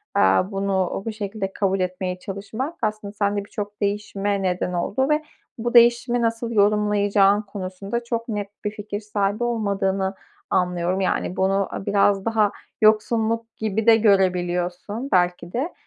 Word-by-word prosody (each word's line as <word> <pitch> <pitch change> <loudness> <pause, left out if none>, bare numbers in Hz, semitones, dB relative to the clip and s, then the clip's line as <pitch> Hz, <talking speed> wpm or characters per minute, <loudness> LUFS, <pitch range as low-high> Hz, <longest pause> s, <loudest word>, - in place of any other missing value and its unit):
aaa, 95 - +3
bunu 195 -1 -1
bu 225 - -2
şekilde 200 -2 -4
kabul 195 -1 0
etmeye 185 0 -2
çalışmak 210 - -5
aslında 215 -2 -2
sende 205 -1 -1
birçok 205 0 -7
değişime 200 0 -1
neden 180 -1 -1
oldu 235 +10 0
ve 300 +1 +2 0.3
bu 240 +1 -3
değişimi 240 +1 +5
nasıl 230 0 -1
yorumlayacağın 205 -1 +3
konusunda 200 +2 -5
çok 235 0 -3
net 205 -2 -3 0.2
bir 210 - 0
fikir 205 -1 -5
sahibi 210 +1 -1
olmadığını 195 -4 0 0.3
anlıyorum. 180 +1 0
Yani, 185 -1 -1
bunu 195 +1 +1
biraz 200 0 +1
daha 220 -3 +2 0.3
yoksunluk 225 +1 +2
gibi 220 0 -1
de 225 -1 +8
görebiliyorsun 185 +2 +1
belki 175 -1 +1
de. 280 +9 -2
205 Hz, 135 wpm, -23 LUFS, 190-220 Hz, 0.3 s, de